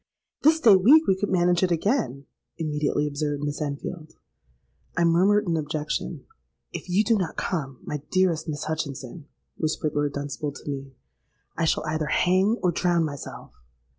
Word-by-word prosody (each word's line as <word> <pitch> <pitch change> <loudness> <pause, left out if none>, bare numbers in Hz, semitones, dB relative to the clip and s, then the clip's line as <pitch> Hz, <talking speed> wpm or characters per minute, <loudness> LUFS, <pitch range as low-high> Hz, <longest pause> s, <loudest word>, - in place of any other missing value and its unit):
'—'This 315 +2 +5
day 220 -5 +8
week 275 +13 +6
we 190 - +3
could 200 +2 -2
manage 175 -1 +3
it 185 - +3
again,' 170 - 0 0.3
immediately 150 -2 0
observed 145 0 -2
Miss 145 +1 -3
Enfield.—I 145 - -7
murmured 190 +5 +4
an 170 - +1
objection.—'If 155 - -5
you 190 +4 +3
do 230 +1 +3
not 185 - -3
come, 135 -8 -3
my 150 -1 -4
dearest 185 -4 +1
Miss 150 -1 -3
Hutchinson,' 150 -1 -5 0.3
whispered 155 -1 -1
Lord 145 -1 0
Dunstable 145 +1 -4
to 140 - -13
me, 135 -2 -5 0.6
'I 165 - 0
shall - - +1
either 155 0 -1
hang 190 +8 +2
or 180 - +3
drown 175 -1 +1
myself.' 145 -2 -7
160 Hz, 150 wpm, -25 LUFS, 145-185 Hz, 0.6 s, day